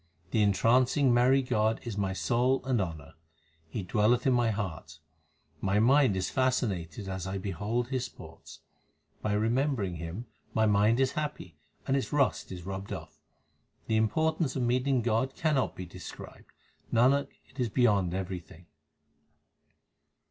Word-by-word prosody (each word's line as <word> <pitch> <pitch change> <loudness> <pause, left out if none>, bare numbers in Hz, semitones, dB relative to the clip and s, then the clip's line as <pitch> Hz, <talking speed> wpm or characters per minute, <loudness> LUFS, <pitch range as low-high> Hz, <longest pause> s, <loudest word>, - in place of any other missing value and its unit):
The 110 - +2
entrancing 120 +6 +3
merry 130 +3 +4
God 110 -2 +1
is 115 -4 -5
my 100 -2 -1
soul 125 +7 +1
and 130 -5 +1
honour; 80 -4 -6 0.6
He 95 - -4
dwelleth 110 +6 +2
in 130 - +4
my 120 -2 +2
heart; 85 -7 -4 0.6
my 100 +2 +2
mind 130 -2 +4
is 95 - -1
fascinated 105 - -1
as 95 -1 -4
I 95 +1 -3
behold 105 +6 -2
His 130 -2 -1
sports. - - -12 0.6
By 105 - -1
remembering 110 - 0
Him 85 +8 -6 0.3
my 110 - +3
mind 105 +3 +3
is 135 -1 +2
happy, 150 -1 -5 0.3
and 135 - +1
its 135 - -1
rust 140 -8 +1
is 90 -2 -7
rubbed 95 +1 -6
off. - - -7 0.7
The 110 - 0
importance 155 +6 +1
of 130 - 0
meeting 125 +1 +1
God 120 +3 0
l - - -32
cannot 150 -5 +1
be 90 - -6
described; 90 +1 -11 0.4
Nanak, 135 +5 +3 0.2
it 140 - -17
is 120 -2 +1
beyond 100 -6 +2
everything. 90 -2 -6
110 Hz, 150 wpm, -29 LUFS, 95-130 Hz, 0.7 s, merry